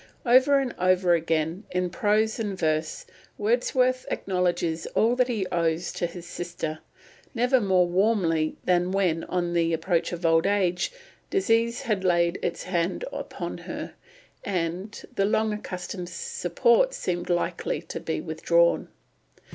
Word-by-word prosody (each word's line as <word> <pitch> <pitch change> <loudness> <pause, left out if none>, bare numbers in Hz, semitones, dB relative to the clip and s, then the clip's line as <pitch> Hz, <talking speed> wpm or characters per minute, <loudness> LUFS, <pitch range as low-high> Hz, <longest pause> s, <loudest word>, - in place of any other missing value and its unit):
Over 260 +3 +6
and 265 -3 -1
over 185 -1 +3
again, 165 +2 0
in 180 -1 -1
prose 215 +3 +1
and 205 -4 -3
verse, 155 -1 -1 0.3
Wordsworth 250 +3 +1
acknowledges 175 -3 -1
all 230 +2 +3
that 250 -1 +2
he 220 -6 -1
owes 165 0 0
to 175 - -1
his 170 0 -10
sister; 170 -3 -5 0.6
never 250 +2 +3
more 190 -3 +3
warmly 175 -4 +1
than 180 0 +2
when, 180 -4 +1
on 175 -1 -1
the 165 -1 +2
approach 165 +1 0
of 175 -1 -5
old 165 +2 +4
age, 190 - +1 0.4
disease 235 -10 +1
had 210 -4 -1
laid 170 -1 +2
its 170 - -2
hand 180 - -1
upon - - -5
her, - - -6 0.5
and 185 +2 -3
the 195 - +2
long 215 +1 +1
accustomed 180 -3 -6
support 475 - +1
seemed 175 -1 -3
likely 175 - -1
to - - -6
be - - -3
withdrawn. - - +2
185 Hz, 140 wpm, -26 LUFS, 170-220 Hz, 0.6 s, Over